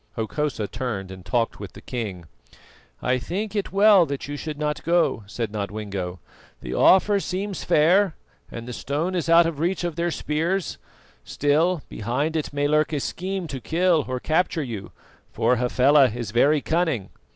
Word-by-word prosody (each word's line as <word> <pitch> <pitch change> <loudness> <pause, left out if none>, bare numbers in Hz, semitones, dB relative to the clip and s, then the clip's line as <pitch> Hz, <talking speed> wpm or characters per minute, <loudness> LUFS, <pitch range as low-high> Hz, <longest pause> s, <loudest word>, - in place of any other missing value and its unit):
Hokosa 115 0 -2
turned 105 -5 -4
and 95 -1 -10
talked 115 +3 -1
with - - -8
the - - -11
king. 100 -8 -5 0.8
"I 125 0 +1
think 195 - -4
it 205 - -2
well 200 -3 +6
that 140 -1 -4
you 145 - -4
should 150 0 -5
not 150 0 -2
go," 170 -7 +2
said 110 +1 -4
Nodwengo. 100 -3 -4 0.4
"The - - -5
offer 200 +2 +5
seems 195 +1 -4
fair, 180 +4 +3 0.3
and 115 0 -8
the 125 - -5
stone 150 +9 -2
is 170 -3 -2
out 165 0 +7
of 165 -3 -3
reach 175 +3 0
of 170 -2 -3
their 170 +1 0
spears; 165 +4 -2 0.4
still, 155 +3 +1
behind 130 +9 -2
it 155 - -2
may 145 0 0
lurk 150 +1 +2
a 145 - 0
scheme 185 +5 -3
to 135 -3 -5
kill 170 -1 +2
or 130 0 -2
capture 160 +2 0
you, 110 -7 -6 0.4
for 125 +2 +2
Hafela 130 +3 +4
is 115 -1 -5
very 145 +6 +3
cunning." 160 - -1
150 Hz, 170 wpm, -24 LUFS, 120-170 Hz, 0.8 s, out